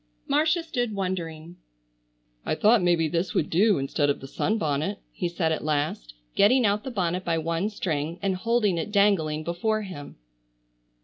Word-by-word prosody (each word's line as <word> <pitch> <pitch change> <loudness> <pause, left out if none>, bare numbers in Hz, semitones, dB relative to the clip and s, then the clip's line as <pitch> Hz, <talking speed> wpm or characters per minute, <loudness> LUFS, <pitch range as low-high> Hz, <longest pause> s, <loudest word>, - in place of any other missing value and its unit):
Marcia 310 +4 +2
stood 245 -9 -2
wondering. 175 -3 -4 0.9
"I - - -1
thought 215 +5 +4
maybe 170 -2 +2
this 170 +4 -2
would 155 - 0
do 200 +4 +4
instead 140 +2 0
of 140 - 0
the 135 - -9
sunbonnet," 160 +1 -1
he 175 - -3
said 170 -2 -1
at 160 - -2
last, 145 - -2 0.2
getting 245 +4 +4
out 205 +1 +1
the - - -5
bonnet 185 -5 -1
by 165 - 0
one 165 +5 -1
string 165 -5 -3
and 195 -1 0
holding 210 -3 +1
it 185 - -4
dangling 185 -7 +2
before 215 +6 -1
him. 180 -8 -9
180 Hz, 165 wpm, -26 LUFS, 160-210 Hz, 0.9 s, thought